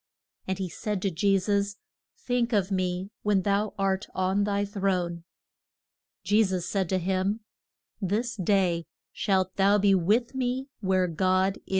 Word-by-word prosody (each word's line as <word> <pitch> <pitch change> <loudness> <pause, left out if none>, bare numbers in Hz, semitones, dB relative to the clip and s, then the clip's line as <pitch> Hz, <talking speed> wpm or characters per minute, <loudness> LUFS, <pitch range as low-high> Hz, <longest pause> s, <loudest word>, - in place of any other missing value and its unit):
And 190 -1 -1
he 190 -1 -2
said 205 +4 -3
to 195 - +1
Je 195 +4 +2
sus, 200 +1 0 0.4
Think 245 - -1
of 200 -2 +1
me 185 +1 -1
when 205 -3 +2
thou 200 +1 0
art 195 0 0
on 190 +2 +1
thy 205 0 0
throne. 185 -4 -1 1.0
Je 205 +4 +4
sus 185 -3 -1
said 190 -3 -1
to 190 - +2
him, 190 +4 0 0.6
This 215 +6 -1
day 180 -4 +1 0.3
shalt 190 -2 0
thou 200 +1 +5
be 200 -1 +4
with 210 +8 +2
me 260 +1 -2
where 190 -3 +2
God 185 +3 +1
is. - - -18
195 Hz, 155 wpm, -27 LUFS, 185-205 Hz, 1.0 s, thou